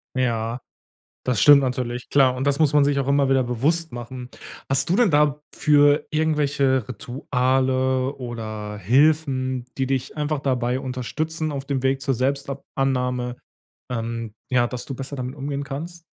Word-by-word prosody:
Ja, 120 -1 -1 0.7
das 125 -3 +1
stimmt 145 -1 +8
natürlich. 125 -1 -3
Klar, 130 -3 +4
und 135 +2 -2
das 140 +2 +1
muss 150 -2 +4
man 145 -1 +5
sich 140 -1 +1
auch 135 - -2
immer 140 -1 +3
wieder 135 -1 +3
bewusst 145 +7 0
machen. 125 +1 -7 0.4
Hast 135 +4 +2
du 175 - +2
denn 230 -4 +4
dafür 145 0 +3
irgendwelche 145 -5 +1
Rituale 130 +2 0
oder 110 -4 -6
Hilfen, 130 - +2
die 135 -1 0
dich 135 +2 -2
einfach 150 0 -1
dabei 125 -2 0
unterstützen, 155 +5 -3
auf 140 -2 -4
dem 135 -2 -2
Weg 135 0 +1
zur 135 -1 0
Selbstab 140 +2 -2
Annahme, 125 -2 0 0.6
ähm, 115 -2 -4 0.2
ja, 120 -2 +2
dass 125 -1 -5
du 135 - -5
besser 135 +2 -6
damit 130 +1 -4
umgehen 140 0 -4
kannst? 165 +5 -7
135 Hz, 155 wpm, -23 LUFS, 125-145 Hz, 0.7 s, stimmt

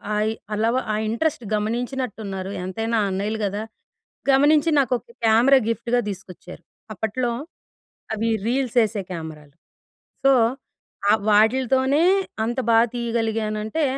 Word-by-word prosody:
ఆయి 215 +1 +1 0.2
అలవ 225 +3 +1 0.2
ఆ - - 0
ఇంట్రస్ట్ 255 +2 -1
గమనించినట్టున్నారు. 215 -4 -3
ఎంతైనా 225 +5 -1
అన్నయ్యలు 205 +3 -2
గదా! 205 +2 -3 0.7
గమనించి 295 +4 +4
నాకొక 255 -3 0 0.2
కేమెరా 235 +5 +6
గిఫ్ట్‌గా 235 +1 0
దీసుకొచ్చారు. 180 -2 -9 0.3
అప్పట్లో 235 +4 -2 0.8
అవి 220 +1 -1 0.2
రీల్సేసే 235 -4 +1
కేమెరాలు. 155 -3 -8 0.7
సో, 275 - +6 0.8
ఆహ్, 215 - +4
వాటిలితోనే 260 +7 +3 0.4
అంత 240 +3 -3
బా 225 - +6 0.2
తీయగలిగానంటే, 225 +2 -1
225 Hz, 100 wpm, -23 LUFS, 210-255 Hz, 0.8 s, కేమెరా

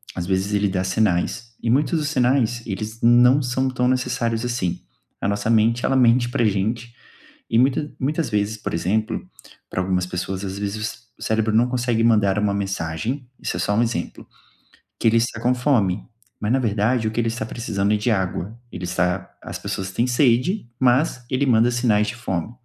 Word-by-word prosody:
às 90 -1 -3
vezes, 95 +2 0
ele 100 0 +2
dá 95 0 -1
sinais, 110 +4 0
e 115 - -1
muitos 150 +6 +2
dos 150 -1 -1
sinais, 125 -4 +1
eles 110 +2 -5
não 125 +4 +6
são 130 +1 0
tão 125 -1 0
necessários, 120 -2 0
assim. 120 -8 -2 0.4
A - - 0
nossa 100 +2 -1
mente, 115 +2 +3
ela 135 - +2
mente 120 -1 +4
para 120 - 0
gente, 110 +4 -1 0.6
e 115 - +3
muita 140 +3 +2
muitas 150 +4 -1
vezes, 105 +1 0
por 105 - -5
exemplo, 105 +6 -1 0.4
para 95 - -2
algumas 90 -1 0
pessoas, 95 +2 -4
às 95 +1 -4
vezes, 100 +1 -3
o 110 - -5
c 115 -2 -22
o - - -11
cérebro 110 0 0
não 120 +2 +4
consegue 120 -2 0
mandar 105 -3 +3
uma 105 -1 +1
mensagem, 100 - -3
isso - - -3
é - - -2
só 105 - 0
um 115 - +3
exemplo, 115 -8 -3 0.7
que - - +2
ele 115 +1 +4
está 115 -1 0
com 125 +2 +2
fome, 115 -8 +1 0.4
mas 105 +2 0
na 135 - +4
verdade 110 0 +1
o - - -1
que 120 - 0
ele 115 - -1
está 115 -1 -2
precisando 105 -3 -1
é - - +3
de 105 +4 -1
água, 95 +2 -2
ele 90 0 -5
está 90 +1 -1
as - - -7
pessoas 95 -1 -4
têm 120 +6 0
sede, 125 - +2
mas 130 +1 +2
ele 135 +2 +1
manda 120 -1 +4
sinais 115 -4 +2
de 110 - -4
fome. 95 -4 -3
115 Hz, 200 wpm, -22 LUFS, 100-125 Hz, 0.7 s, não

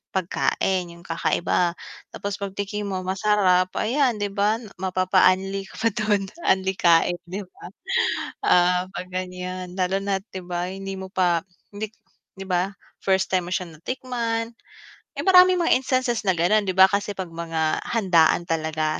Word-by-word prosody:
pagkain 185 -1 0
yung 170 - -14
kakaiba, 170 +1 0 0.4
tapos 200 0 -4
pagtikim 200 +1 -4
mo 195 -2 -3
masarap 185 -1 +2
ayan 245 -2 +1
di 205 - 0
ba 205 +3 +1 0.2
mapapa-unli 185 +1 +2
ka 225 +4 -1
dun 205 -3 +1 0.2
unli-kain, 180 -2 +3
di 185 +3 -5
ba? 185 -3 -13 0.8
Ah, 180 +1 +4
pag 185 -2 -6
ganyan, 185 0 -5
lalo 185 0 0
na't, 195 -1 -1
'di 190 - -7
ba, 175 0 -3
hindi 195 0 -6
mo 190 0 -7
pa 180 -3 +1 0.3
hindi 210 +1 -4 0.5
'di 195 - -7
ba, 185 0 0 0.3
first 190 -1 +1
time 180 -1 +1
mo - - -9
siya 180 -3 -3
natikman. 230 +4 -3 0.6
Eh, - - -3
maraming 365 -1 +6
mga 330 - +4
instances 255 -4 0
na 190 - +5
ganon 200 +5 +2
di 185 - 0
ba, 190 0 +7
kasi 200 0 -1
'pag 185 -3 -6
mga 165 -1 -1
handaan 175 -7 +3
talaga 155 -1 -1
190 Hz, 150 wpm, -24 LUFS, 180-205 Hz, 0.8 s, ba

